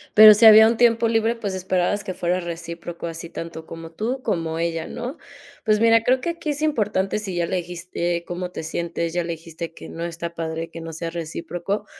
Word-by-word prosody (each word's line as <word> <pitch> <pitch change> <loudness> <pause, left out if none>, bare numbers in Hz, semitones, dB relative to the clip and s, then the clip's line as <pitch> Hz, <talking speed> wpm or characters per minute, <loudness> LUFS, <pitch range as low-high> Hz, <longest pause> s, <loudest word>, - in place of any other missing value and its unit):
Pero 215 0 +11
si 215 +2 +4
había 220 0 +10
un 230 - +2
tiempo 230 -1 +4
libre, 225 +1 +1
pues, 205 -4 -4
esperabas 185 +2 0
que 185 - -4
fuera 180 0 0
recíproco, 170 0 -6
así 165 0 -7
tanto 165 -1 -7
como 165 0 -9
tú, 235 +9 -3
como 165 -3 -1
ella, 165 -1 -2
¿no? 245 +5 -6 0.5
Pues, 215 -1 +3
mira, 230 0 +5
creo 255 +2 +2
que 340 - -2
aquí 335 -2 -6
es 295 0 -2
importante. 210 -9 0
Si 195 -4 -5
ya 175 -1 +1
le 185 - -1
dijiste 175 0 -3
cómo 180 +1 -4
te 180 - -7
sientes. 170 +1 -3
Ya 175 0 0
le 170 0 -3
dijiste 165 0 -8
que - - -10
no 165 - -6
está 170 0 -5
padre 165 0 -4
que 165 - -8
no 165 0 -6
sea 165 +1 -4
recíproco, 175 +4 -4
175 Hz, 215 wpm, -23 LUFS, 165-215 Hz, 0.5 s, Pero